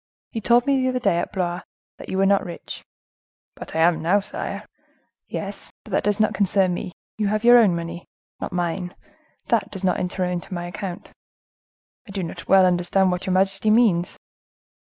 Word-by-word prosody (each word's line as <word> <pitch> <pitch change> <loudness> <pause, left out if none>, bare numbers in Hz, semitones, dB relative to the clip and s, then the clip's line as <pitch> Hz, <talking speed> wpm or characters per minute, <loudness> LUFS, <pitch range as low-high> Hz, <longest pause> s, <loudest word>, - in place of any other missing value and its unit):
You 225 - -4
told 240 +3 +4
me 275 -1 +2
the 255 - +1
other 255 - -1
day, 170 -7 +2
at - - -3
Blois, 180 -2 -2 0.4
that - - -10
you 190 - -2
were 195 - +3
not 200 0 +3
rich?" 175 -2 -8 0.7
"But - - -9
I 160 - +2
am 165 -1 +3
now, 180 +6 +3
sire." 200 - -5 0.6
"Yes, - - -6
but - - -13
that - - +1
does 205 0 +1
not 215 - +2
concern 195 -2 +2
me; 175 - -5 0.3
you 210 - +1
have 215 +2 0
your 240 0 +8
own 200 -7 +4
money, 170 +1 -6 0.3
not - - -4
mine; 175 0 -2 0.5
that - - +2
does 195 -1 -8
not 185 -1 +1
enter 180 0 -1
into 180 +1 -4
my 175 0 -4
account." 175 0 -6 1.0
"I - - -9
do 195 -2 -2
not 165 - -7
well 190 -1 +6
understand 180 +1 +2
what 180 +1 -3
your 185 - +1
majesty 195 +2 +2
means." 215 -6 +3
190 Hz, 195 wpm, -23 LUFS, 175-205 Hz, 1.0 s, your